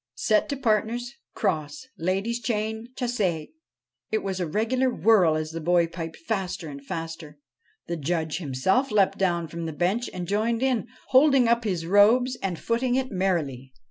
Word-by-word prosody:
Set 215 Hz, -, +2 dB
to 280 Hz, -, -2 dB
partners 240 Hz, +1 st, 0 dB, 0.2 s
cross 160 Hz, -, -2 dB
ladies' 195 Hz, +7 st, -1 dB
chain 220 Hz, 0 st, -2 dB
chasse" 245 Hz, -3 st, -2 dB
I 165 Hz, -5 st, 0 dB, 0.6 s
It 220 Hz, -, -1 dB
was 190 Hz, -1 st, -3 dB
a 175 Hz, -, -1 dB
regular 230 Hz, +9 st, +1 dB
whirl 210 Hz, -9 st, +4 dB
as 155 Hz, 0 st, -3 dB
the 165 Hz, 0 st, -5 dB
boy 175 Hz, +1 st, +3 dB
piped 165 Hz, -1 st, -7 dB
faster 185 Hz, -3 st, -3 dB
and 140 Hz, -1 st, -9 dB
faster. 165 Hz, 0 st, -6 dB, 0.5 s
The 170 Hz, -, -3 dB
Judge 160 Hz, +1 st, -2 dB
himself 180 Hz, -, +1 dB
leapt 200 Hz, -3 st, +2 dB
down 170 Hz, -3 st, +1 dB
from 165 Hz, +1 st, -5 dB
the 160 Hz, -, -4 dB
bench 190 Hz, +10 st, 0 dB
and 180 Hz, -1 st, -5 dB
joined 225 Hz, +5 st, 0 dB
in, 255 Hz, -5 st, +1 dB, 0.2 s
holding 270 Hz, -2 st, +5 dB
up 235 Hz, 0 st, +2 dB
his 180 Hz, -5 st, -1 dB
robes 225 Hz, +7 st, +4 dB
and 185 Hz, -3 st, -2 dB
footing 245 Hz, +5 st, 0 dB
it 260 Hz, 0 st, -1 dB
merrily. 155 Hz, -10 st, -1 dB
195 Hz, 170 wpm, -25 LUFS, 165-235 Hz, 0.6 s, holding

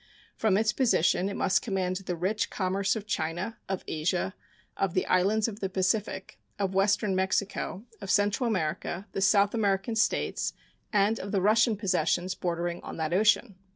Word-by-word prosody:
From 210 Hz, -4 st, +2 dB
its 215 Hz, 0 st, +2 dB
position 195 Hz, -6 st, +2 dB
it 200 Hz, -, -5 dB
must 185 Hz, -, +2 dB
command 185 Hz, -4 st, -1 dB
the 185 Hz, -2 st, -4 dB
rich 190 Hz, +5 st, -1 dB
commerce 195 Hz, +2 st, 0 dB
of 215 Hz, -2 st, -5 dB
China, 180 Hz, +3 st, -3 dB
of 190 Hz, -1 st, -2 dB
Asia, 175 Hz, +4 st, -1 dB, 0.4 s
of 195 Hz, -3 st, -1 dB
the 185 Hz, -, +2 dB
islands 205 Hz, +4 st, +2 dB
of 215 Hz, -2 st, -6 dB
the 195 Hz, -, -2 dB
Pacific, 190 Hz, +1 st, -1 dB, 0.2 s
of 195 Hz, -2 st, -1 dB
western 200 Hz, 0 st, +2 dB
Mexico, 190 Hz, +2 st, -1 dB, 0.2 s
of 195 Hz, -, -7 dB
Central 205 Hz, +6 st, +2 dB
America, 180 Hz, -1 st, -2 dB
the 195 Hz, -, -3 dB
South 200 Hz, 0 st, +4 dB
American 205 Hz, 0 st, 0 dB
States, 215 Hz, -1 st, 0 dB, 0.4 s
and 210 Hz, +1 st, +2 dB
of 195 Hz, -, -6 dB
the 200 Hz, -, +2 dB
Russian 215 Hz, +3 st, +3 dB
possessions 185 Hz, -2 st, 0 dB
bordering 175 Hz, -1 st, -3 dB
on -, -, -8 dB
that 160 Hz, 0 st, -2 dB
ocean. 210 Hz, +1 st, +3 dB
195 Hz, 165 wpm, -28 LUFS, 185-210 Hz, 0.4 s, South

